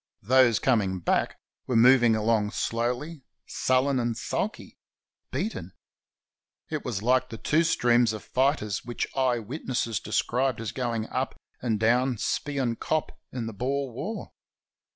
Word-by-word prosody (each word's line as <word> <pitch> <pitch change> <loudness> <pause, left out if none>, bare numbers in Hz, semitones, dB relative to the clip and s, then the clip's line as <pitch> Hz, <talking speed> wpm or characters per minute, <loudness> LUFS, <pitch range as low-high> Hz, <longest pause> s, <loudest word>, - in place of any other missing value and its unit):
Those 125 +1 +5
coming 100 -8 +1
back 85 - 0 0.3
were 125 - -1
moving 120 -1 +6
along 110 -1 +1
slowly, 125 +7 -2 0.2
sullen 130 +1 +1
and 120 -2 -1
sulky 215 - -4 0.2
— - - -59
beaten. 95 - -4 1.0
It 155 -2 -2
was 110 -6 -3
hke 130 +2 +2
the 115 - -7
two 155 +8 +2
streams 120 -7 +3
of 110 -1 -6
fighters 125 -6 0
which 120 0 -3
eye 130 -2 +2
witnesses 120 -1 -3
described 125 0 0
as 115 -4 -4
going 120 -4 -2
up 130 -1 -3 0.2
and 115 -4 0
down 120 +3 +2
Spion 130 0 -1
Kop 155 -1 -1 0.2
in 125 -3 -4
the 115 - -5
Boer 135 +5 -2
War. 200 - -5
120 Hz, 140 wpm, -27 LUFS, 115-130 Hz, 1.0 s, moving